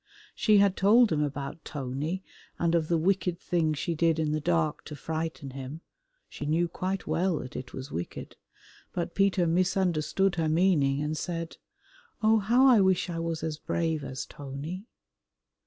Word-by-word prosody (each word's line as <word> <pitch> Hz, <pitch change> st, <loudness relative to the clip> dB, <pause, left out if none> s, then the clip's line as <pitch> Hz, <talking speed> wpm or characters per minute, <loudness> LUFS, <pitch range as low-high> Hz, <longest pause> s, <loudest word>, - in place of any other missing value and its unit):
She 215 Hz, -2 st, +4 dB
had 200 Hz, -1 st, +4 dB
told 220 Hz, +3 st, +5 dB
him 150 Hz, -2 st, +1 dB
about 145 Hz, +1 st, -4 dB
Tony 145 Hz, +7 st, -4 dB, 0.3 s
and 170 Hz, -1 st, +1 dB
of 165 Hz, -2 st, +2 dB
the 170 Hz, -, +2 dB
wicked 180 Hz, 0 st, +1 dB
thing 165 Hz, -4 st, 0 dB
she 170 Hz, +4 st, -2 dB
did 165 Hz, 0 st, +2 dB
in 155 Hz, -2 st, 0 dB
the 155 Hz, -, 0 dB
dark 165 Hz, -2 st, 0 dB
to 150 Hz, -, -7 dB
frighten 160 Hz, -1 st, -4 dB
him 135 Hz, +4 st, -7 dB, 0.5 s
(she 145 Hz, -, -6 dB
knew 165 Hz, +3 st, +2 dB
quite 185 Hz, +3 st, -3 dB
well 180 Hz, -1 st, +1 dB
that 130 Hz, -, -7 dB
it 130 Hz, -, -6 dB
was 130 Hz, +1 st, -7 dB
wicked), 85 Hz, +1 st, -6 dB, 0.6 s
but 175 Hz, -1 st, -3 dB
Peter 195 Hz, -2 st, +2 dB
misunderstood 180 Hz, +1 st, +1 dB
her 160 Hz, -2 st, +1 dB
meaning 155 Hz, -5 st, +3 dB
and 150 Hz, +1 st, -2 dB
said, 165 Hz, 0 st, -4 dB, 0.7 s
"Oh, 220 Hz, +1 st, +5 dB
how 235 Hz, +6 st, +4 dB
I 245 Hz, -6 st, +7 dB
wish 190 Hz, -1 st, +2 dB
I 165 Hz, -, -3 dB
was 165 Hz, -1 st, -3 dB
as 155 Hz, -1 st, -3 dB
brave 160 Hz, -3 st, -1 dB
as 130 Hz, -1 st, -5 dB
Tony." 145 Hz, -, -7 dB
165 Hz, 170 wpm, -28 LUFS, 150-185 Hz, 0.7 s, I